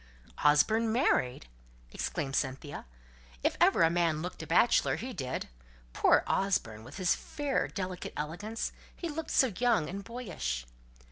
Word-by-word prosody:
"Osborne 220 +10 +4
married!" 130 - +1 0.5
exclaimed 135 0 -3
Cynthia. 135 - -3 0.6
"If - - +2
ever - - +5
a 165 - +5
man 165 -2 +1
looked 180 - -5
a 160 - -7
bachelor, 175 +9 +4
he 255 +2 -5
did. 130 - -3 0.5
Poor - - +4
Osborne! 120 - 0
with 130 +8 -10
his 185 -3 +3
fair 290 -2 -2
delicate 185 -2 -5
elegance, 190 +9 -3 0.2
he 345 - -4
looked 315 +1 -4
so 260 -6 +3
young 230 -9 +2
and 200 +4 -5
boyish!" 180 - -4
180 Hz, 140 wpm, -31 LUFS, 145-230 Hz, 0.6 s, ever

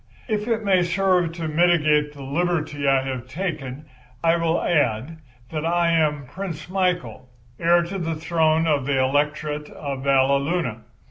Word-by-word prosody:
If 215 -2 -1
it 225 -2 0
may 190 -2 +4
serve 180 -1 +1
to 165 -1 -4
mitigate 155 -2 +3
the 140 -2 -10
liberty 150 -1 -1
I 135 -1 +3
have 130 -2 -5
taken 150 -3 -5 0.4
I 165 0 +4
will 165 0 +1
add 145 0 0 0.3
that 155 -1 -3
I 170 0 +2
am 150 -4 +1
Prince 170 +2 -6
Michael, 180 -8 -2 0.3
heir 170 +1 +4
to 190 +3 -5
the 165 -2 -2
throne 160 0 +1
of 145 -4 +1
the 140 -2 +1
Electorate 150 +2 0
of 140 -3 -6
Valleluna. 140 -1 +1
160 Hz, 150 wpm, -23 LUFS, 140-175 Hz, 0.4 s, may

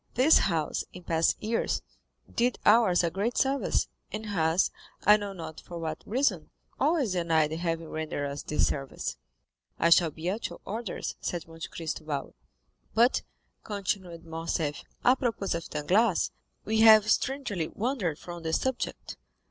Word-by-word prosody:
This 270 +6 +6
house, 165 -5 0
in 180 - -10
past 165 -1 +2
years, 225 +2 0 0.5
did 245 +1 +2
ours 210 -5 +5
a 170 - +1
great 205 +7 -1
service, 275 0 +1 0.2
and 215 +1 -5
has, 170 -4 +2 0.3
I 210 - +9
know 205 -1 -3
not 160 -4 -8
for 175 - -8
what 160 -1 -4
reason, 260 +6 +1 0.3
always 300 - +2
denied 165 -4 +2
having 165 0 -2
rendered 155 -2 -3
us 140 +1 -5
this 150 - +1
service." 135 - -3 0.6
"I 170 - +3
shall 170 -1 +6
be 160 +3 -7
at 205 +5 -1
your - - -10
orders," 220 -1 -4
said 175 -2 -3
Monte 165 0 -7
Cristo 160 -1 -5
bowing. 145 -3 -4 0.6
"But," 240 +3 +4 0.4
continued 190 -5 -3
Morcerf, 160 -2 -2 0.2
"à 250 - +7
propos 230 -6 -1
of 170 0 -4
Danglars,—we 205 +5 0
have 215 -1 +8
strangely 235 - 0
wandered 210 - -2
from 175 0 -8
the 160 0 -3
subject. 260 +7 -2
180 Hz, 150 wpm, -28 LUFS, 160-220 Hz, 0.6 s, I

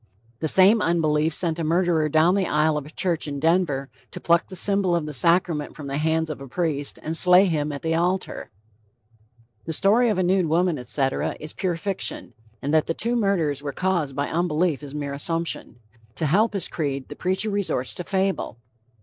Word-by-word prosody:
"The 160 - -1
same 195 +7 +5
unbelief 160 -3 +1
sent 165 +1 0
a - - -1
murderer 165 -1 +1
down 160 +4 +4
the 195 -2 +1
isle 155 +1 +2
of 150 -1 -4
a - - -10
church 170 -1 -1
in 140 -1 -4
Denver 160 -4 +1 0.2
to - - -8
pluck 170 0 +2
the 185 - -9
symbol 195 -2 +1
of 165 -3 -1
the 150 - -6
sacrament 165 +1 +1
from 150 - -9
the 140 +1 -3
hands 160 0 0
of 145 - -8
a 135 - -8
priest 145 -1 -2
and 160 +1 -2
slay 180 +3 +6
him 150 -4 -1
at 140 - -7
the 165 0 0
altar." 180 +3 -1 1.2
The 160 - -3
story 225 +8 +4
of 210 - 0
a 185 - +1
"nude 185 -1 +2
woman," 165 -1 +1
etc., 135 +2 -2
is 155 0 -4
pure 180 -3 -2
fiction, 195 +2 -3 0.3
and 145 +2 -1
that 155 -1 +3
the 165 - -1
two 235 +2 -1
murders 175 - 0
were 145 -1 -5
caused 175 -5 -1
by 145 0 -1
unbelief 165 -2 0
is 145 -1 -9
mere 145 -1 -4
assumption. 165 -2 -3 0.4
To 160 - -2
help 205 +9 +2
his 195 - -1
creed, 140 -4 -3
the 145 - -8
preacher 190 +5 0
resorts 190 -11 -1
to 180 - -4
fable. 190 - -1
165 Hz, 200 wpm, -23 LUFS, 150-185 Hz, 1.2 s, slay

